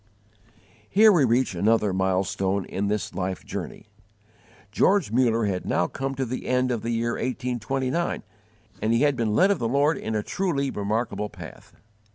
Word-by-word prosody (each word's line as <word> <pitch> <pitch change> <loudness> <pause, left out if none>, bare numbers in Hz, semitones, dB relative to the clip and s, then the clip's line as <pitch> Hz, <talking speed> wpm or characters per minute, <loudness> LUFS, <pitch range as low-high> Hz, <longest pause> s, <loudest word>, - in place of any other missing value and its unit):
Here 215 +2 +6
we 165 -8 +4
reach 125 -1 +1
another 105 +2 +2
mile 95 0 +1
stone 95 0 -1
in 100 +2 -3
this 105 0 -2
life 95 0 -4
journey. - - -6 0.9
George 190 - +2
Muller 115 -2 +2
had 95 -3 -2
now 90 - +1
come 135 +9 -4
to 135 0 -1
the 125 +1 -5
end 125 0 +1
of 120 -3 -2
the 115 - -4
year 115 0 0
1829, 130 +5 -2 0.6
and 110 +2 +1
he 115 - +3
had 145 -2 +3
been 110 -4 0
led 190 - +5
of 195 - 0
the 115 - 0
Lord 145 +5 +2
in 110 - -3
a 105 - -1
truly 140 - -1
remarkable 105 +1 -2
path. - - -12
115 Hz, 175 wpm, -25 LUFS, 105-135 Hz, 0.9 s, Here